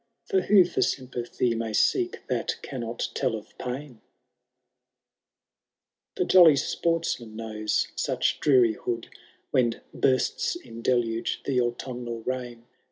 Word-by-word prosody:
For 390 -4 +2
who 195 -4 +6
for 175 - -2
sympathy 125 -2 -1
may 115 -1 -3
seek 360 - +1
that - - -1
cannot 120 -3 -4
tell - - 0
of 110 - -10
pain? 125 -1 -6 2.1
The - - 0
jolly 170 -5 +7
sportsman 160 -8 -1
knows 110 -1 -1
such - - 0
drearihood. 120 -4 +2 0.4
When 120 -3 +2
bursts 130 -2 +1
in 115 0 -10
deluge 115 -2 0
the 130 -3 +2
autumnal 120 -1 -4
rain. 120 -2 -4
120 Hz, 110 wpm, -26 LUFS, 115-135 Hz, 2.1 s, jolly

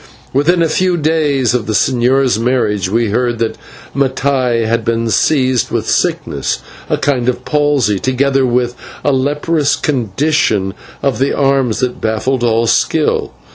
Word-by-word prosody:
Within 165 +6 +2
a - - +2
few 180 +3 +1
days 150 -6 +1
of 120 -4 -1
the 110 - -1
señor's 125 +1 +2
marriage 115 -6 0
we 115 +2 +1
heard 120 +1 0
that 115 -1 -1 0.4
Mattai 130 -3 0
had 115 +1 0
been 115 0 -1
seized 130 +1 +2
with - - -2
sickness, - - -1 0.3
a - - +1
kind 125 -4 0
of 125 0 -3
palsy, 145 -9 +1
together 135 +2 +1
with 125 -1 +1 0.3
a 145 - +2
leprous 145 +3 0
condition 120 -5 0 0.3
of 135 -5 0
the 135 - 0
arms 135 -5 +1
that 125 -1 -2
baffled 120 +4 -1
all 115 0 +2
skill. - - +1
130 Hz, 145 wpm, -15 LUFS, 115-140 Hz, 0.4 s, Within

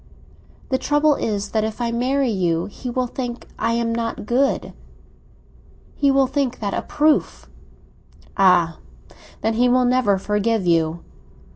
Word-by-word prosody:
"The 260 - +1
trouble 295 +1 +2
is 205 -6 -2
that 220 -1 0
if 220 +1 -4
I 235 -1 -1
marry 255 +2 0
you, 175 -4 0
he 250 +5 -7
will 255 +1 -1
think 245 -1 -6
I 230 +1 0
am 230 0 0
not 230 -2 -3
good. 260 +5 0 1.2
He 280 - +1
will 270 0 +4
think 265 -1 -1
that 205 -2 -3
a - - -1
proof." 300 0 0 0.9
"Ah, 180 -4 +3 0.6
then, 225 +1 0
he 245 +2 +2
will 250 0 +3
never 245 -5 +2
forgive 210 +1 0
you!" 165 -1 +1
235 Hz, 145 wpm, -21 LUFS, 205-255 Hz, 1.2 s, will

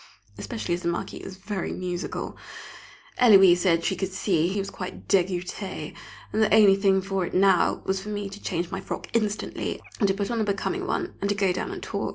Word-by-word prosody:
Especially 105 +7 -4
as 175 - -2
the 170 - -3
Marquis 170 0 -2
is 190 - -8
very 195 -1 -4
musical! 180 -1 -4 0.8
Héloise 195 -7 +8
said 170 -2 +2
she - - +1
could 190 -1 -3
see 180 -3 +1
he 190 +3 -2
was 195 0 -2
quite 185 -1 -7
"dégoûté," 185 -2 -1 0.4
and 215 - +1
the 215 - +3
only 210 -3 +7
thing 195 -1 +2
for 195 -1 -1
it - - -4
now, 190 -1 +3
was 190 0 0
for 210 - -7
me 205 -1 -3
to 200 +1 -10
change 175 -1 -2
my - - -3
frock - - -6
instantly, 215 -2 -1 0.2
and 205 - +3
to 195 - +1
put 200 +2 -2
on 230 -1 0
a - - +3
becoming 285 - -2
one, 360 0 -2
and 200 - 0
to 205 - +1
go 195 -2 +2
down 185 - -3
and - - -6
talk. - - -3
195 Hz, 215 wpm, -26 LUFS, 180-205 Hz, 0.8 s, Héloise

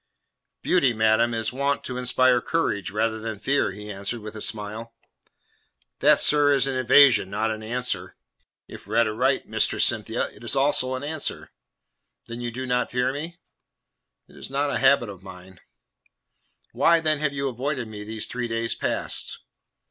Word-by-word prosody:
"Beauty, 140 -9 +3
madam, 110 +1 +2
is 115 +2 -2
wont 140 +2 -1
to 125 -1 -4
inspire 125 0 +3
courage 105 - -1
rather 110 +3 -1
than 110 -1 -5
fear," 135 +6 +1
he 105 +2 -8
answered, 100 +4 -5
with 105 +1 -9
a 110 - -7
smile. 110 +2 -5 1.0
"That, - - +5
sir, 145 -1 +5
is 135 - +2
an 135 -1 -2
evasion, 130 -5 +5
not 110 +3 -1
an 110 0 -5
answer." 125 +3 -3 0.5
"If - - -12
read 115 +1 +2
aright, 110 0 0
Mistress - - +2
Cynthia, - - -1
it - - -17
is - - +1
also 135 -2 +2
an 130 - -6
answer." 155 +1 -4 0.7
"That 115 - -7
you 120 0 -3
do 130 +3 -6
not 125 -1 0
fear 125 +1 0
me?" 165 +5 -6 0.9
"It - - -19
is - - -7
not 140 +1 -1
a - - -1
habit 135 -3 +4
of 95 -3 -10
mine." 95 -1 -13 1.1
"Why, 170 0 +3
then, 155 -2 0
have 145 -1 -1
you 140 0 -2
avoided 130 0 -3
me 105 -1 -8
these 110 +1 -4
three 125 -1 -4
days 115 0 -1
past?" - - -2
120 Hz, 170 wpm, -24 LUFS, 110-140 Hz, 1.1 s, That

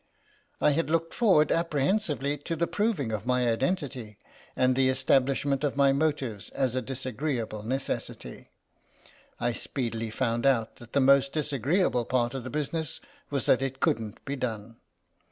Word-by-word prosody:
I - - +4
had 160 +2 0
looked 165 0 0
forward 185 -11 +4
apprehensively 150 -2 0
to 165 +4 -3
the 170 +1 +1
proving 180 - -1
of 110 +2 -4
my 125 -1 +2
identity 130 - -2 0.4
and 130 0 +3
the 130 0 +3
establishment 135 +1 +2
of 145 -1 -1
my 140 -1 +5
motives 135 - -1
as 130 -3 -1
a 130 - 0
disagreeable 130 -4 -3
necessity; 130 +5 -4 0.9
I 120 - +1
speedily 115 -3 -3
found 120 +2 0
out 115 -5 +1
that 120 -1 -14
the 140 - +3
most 140 +1 +5
disagree 150 - 0
able 125 -8 +1
part 120 -1 0
of 135 -2 -4
the 130 - -6
business 150 +1 -3 0.3
was 140 -2 -1
that 130 - +4
it 135 0 -3
couldn't 110 -3 -1
be 140 - -3
done. 115 -3 -4
135 Hz, 155 wpm, -28 LUFS, 120-150 Hz, 0.9 s, my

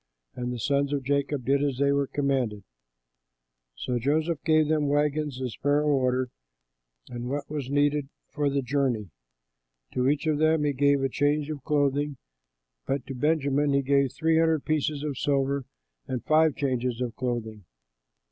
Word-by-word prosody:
'" - - -47
And 125 0 -3
the 125 - -4
sons 140 +4 0
of 140 -2 -1
Jacob 140 -1 -1
did 140 +1 +2
as 140 -3 -1
they 140 +1 +3
were 140 -1 +1
commanded. 130 -8 -1 1.1
So 125 - -2
Joseph 155 +5 0
gave 155 -2 +3
them 155 -1 +1
wagons, 145 -1 0
as 125 -3 -4
Pharaoh 145 +1 +2
ordered, 130 -1 0 0.8
and 120 0 -5
what 145 +2 -3
was 145 -4 -4
needed 145 0 +1 0.2
for 145 0 0
the 140 -1 0
journey. 125 - -1 0.8
To 125 +1 +2
each 145 +2 0
of 155 -2 +1
them 155 -1 +3
he 145 -1 +1
gave 140 0 +3
a - - +3
change 145 +3 0
of 145 -3 -6
clothing, 145 -1 0 0.7
but 135 -2 -1
to 135 - -6
Benjamin 145 0 +1
he 140 0 +2
gave 140 -1 +2
three 160 0 +2
hundred 160 -2 +2
pieces 150 -1 0
of 145 -4 -3
silver 140 -1 0 0.4
and 125 -2 -4
five 155 -1 +4
changes 125 -3 -1
of 120 -3 -3
clothing. 110 -5 -4
140 Hz, 165 wpm, -27 LUFS, 130-150 Hz, 1.1 s, five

